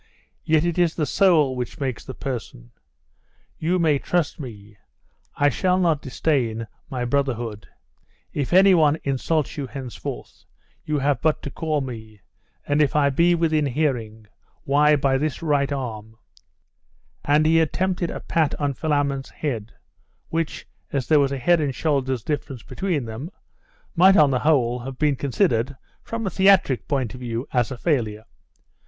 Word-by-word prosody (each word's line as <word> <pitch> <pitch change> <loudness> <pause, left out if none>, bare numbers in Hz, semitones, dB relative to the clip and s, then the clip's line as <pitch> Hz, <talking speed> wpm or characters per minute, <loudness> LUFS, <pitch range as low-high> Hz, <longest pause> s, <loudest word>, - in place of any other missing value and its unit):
yet 155 +1 +2
it 175 0 -1
is 170 -2 +2
the 155 - 0
soul 155 -5 +3
which 125 -1 -5
makes 130 -5 -3
the 130 - -8
person. 115 - -6 0.9
You 170 +3 +1
may 155 -5 +2
trust 175 0 -1
me, 105 -6 -10 0.6
I 145 - +3
shall 180 +6 +1
not 165 -5 +2
disdain 125 -5 -1 0.2
my 125 -4 -3
brotherhood. 120 -5 -2 0.7
If 140 -3 -2
any 190 +2 +6
one 155 -3 +4
insults 145 +3 -1
you 140 -2 -3
henceforth, 130 -2 -7 0.4
you 155 -1 -1
have 140 -2 0
but 155 -1 +1
to 140 - -5
call 155 -2 -1
me; 110 -5 -8 0.5
and 145 +1 +1
if 145 -1 +1
I 140 -2 +3
be 170 +5 +3
within 155 -3 +1
hearing, 120 -6 -2 0.4
why, 150 +2 +4
by 135 -2 +1
this 155 +2 -2
right 145 -3 +1
arm 110 -5 -5 0.6
' - - -43 0.3
And 150 +2 +3
he 165 +1 +4
attempted 180 +2 0
a - - -6
pat 160 -3 0
on 145 -1 0
Philammon's 140 -2 -1
head, 115 -7 -4 0.6
which, 165 -1 -3 0.2
as 135 -3 -1
there 155 -2 +5
was 140 -1 +2
a 140 - -2
head 170 +6 +3
and 140 -4 -1
shoulder's 130 -6 -1
difference 145 -5 -4
between 175 -9 -2
them, 115 +8 -6 0.7
might 190 +3 +6
on 145 -2 +5
the 125 - +1
whole 125 -5 +2
have 130 +1 -7
been 150 -1 +2
considered, 135 - 0 0.2
from 230 -1 -5
a 190 - -1
theatric 190 -9 +3
point 130 -5 -1
of 125 - -9
view, 120 +1 -4
as 125 -4 +2
a 130 - -6
failure. 115 -8 -1
140 Hz, 160 wpm, -23 LUFS, 125-160 Hz, 0.9 s, any